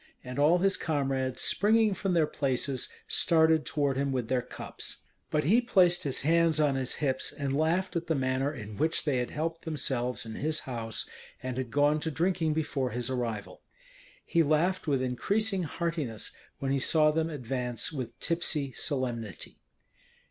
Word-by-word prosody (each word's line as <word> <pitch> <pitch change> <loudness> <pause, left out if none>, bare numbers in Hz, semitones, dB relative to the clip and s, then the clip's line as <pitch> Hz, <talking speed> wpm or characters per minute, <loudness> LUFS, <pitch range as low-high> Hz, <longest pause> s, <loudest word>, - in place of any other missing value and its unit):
and 125 +2 -5
all 155 +5 +5
his 195 +2 +2
comrades, 135 -4 -1
springing 215 0 +3
from 190 -1 -1
their 160 -2 +4
places, 135 -2 -1 0.2
started 160 -2 +3
toward 140 -3 0
him 140 0 0
with 125 -3 -2
their 130 -1 +2
cups. 125 - -6 0.3
But 150 0 +1
he 220 - +4
placed 185 -7 +4
his 140 -7 0
hands 165 +1 +3
on 150 -2 +3
his 130 -1 -1
hips, 130 -3 -1
and 140 -2 -2
laughed 170 +6 +1
at 170 0 -2
the 160 - +1
manner 130 +1 0
in 105 -7 -8
which 160 +2 +1
they 145 -4 +1
had 125 - -2
helped 165 +2 -3
themselves 130 -7 -2
in 110 - -6
his 155 +5 -1
house, 115 -3 -4 0.4
and 130 -1 -3
had 130 -1 -3
gone 145 +4 +3
to 160 - -2
drinking 160 +1 +1
before 145 -4 -1
his 120 +2 -3
arrival. 115 -5 -3 0.6
He 170 - +3
laughed 160 +4 +1
with 135 -3 +1
increasing 195 - 0
heartiness 155 - -3 0.3
when 135 -1 -2
he 135 - +2
saw 155 +2 +4
them 160 +1 0
advance 125 -4 -2
with 125 -5 -5
tipsy 155 -5 0
solemnity. 120 - -3
145 Hz, 170 wpm, -29 LUFS, 130-165 Hz, 0.6 s, all